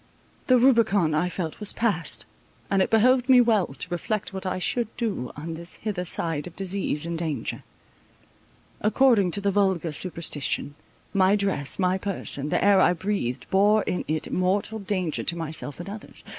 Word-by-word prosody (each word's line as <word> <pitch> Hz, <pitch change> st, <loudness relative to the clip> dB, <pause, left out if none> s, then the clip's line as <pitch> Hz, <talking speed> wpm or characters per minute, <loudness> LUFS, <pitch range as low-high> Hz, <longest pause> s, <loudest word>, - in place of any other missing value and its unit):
The 255 Hz, -, +6 dB
Rubicon, 225 Hz, -, +3 dB
I 175 Hz, +4 st, +1 dB
felt, 170 Hz, -3 st, -4 dB
was 210 Hz, -2 st, -1 dB
passed; 205 Hz, -8 st, 0 dB, 0.5 s
and 195 Hz, -1 st, +3 dB
it -, -, +1 dB
behoved 250 Hz, +3 st, +3 dB
me 255 Hz, -1 st, +8 dB
well 225 Hz, -6 st, +3 dB
to 135 Hz, +6 st, -3 dB
reflect 195 Hz, +4 st, -3 dB
what 190 Hz, 0 st, -5 dB
I 185 Hz, -, -1 dB
should 235 Hz, +5 st, 0 dB
do 200 Hz, -, -3 dB
on 160 Hz, +3 st, -5 dB
this 170 Hz, +2 st, -6 dB
hither 200 Hz, -5 st, -4 dB
side 165 Hz, -3 st, -1 dB
of 170 Hz, -, -12 dB
disease 190 Hz, -5 st, -1 dB
and 170 Hz, 0 st, -3 dB
danger. 155 Hz, -7 st, -3 dB, 1.2 s
According 215 Hz, -3 st, +4 dB
to 200 Hz, +4 st, +1 dB
the 200 Hz, 0 st, +1 dB
vulgar 190 Hz, -5 st, +1 dB
superstition, 150 Hz, -3 st, -1 dB, 0.4 s
my 195 Hz, 0 st, +4 dB
dress, 195 Hz, -9 st, 0 dB
my 185 Hz, 0 st, +1 dB
person, 175 Hz, -7 st, -3 dB
the -, -, +1 dB
air 200 Hz, -1 st, +6 dB
I 180 Hz, -, +4 dB
breathed, 170 Hz, -9 st, -3 dB
bore 205 Hz, +3 st, +4 dB
in 180 Hz, -, -2 dB
it 155 Hz, 0 st, -2 dB
mortal 195 Hz, +4 st, 0 dB
danger 185 Hz, -5 st, -2 dB
to 170 Hz, -, 0 dB
myself 155 Hz, -2 st, -4 dB
and 175 Hz, -, -7 dB
others. 205 Hz, +2 st, -9 dB
190 Hz, 170 wpm, -25 LUFS, 165-210 Hz, 1.2 s, me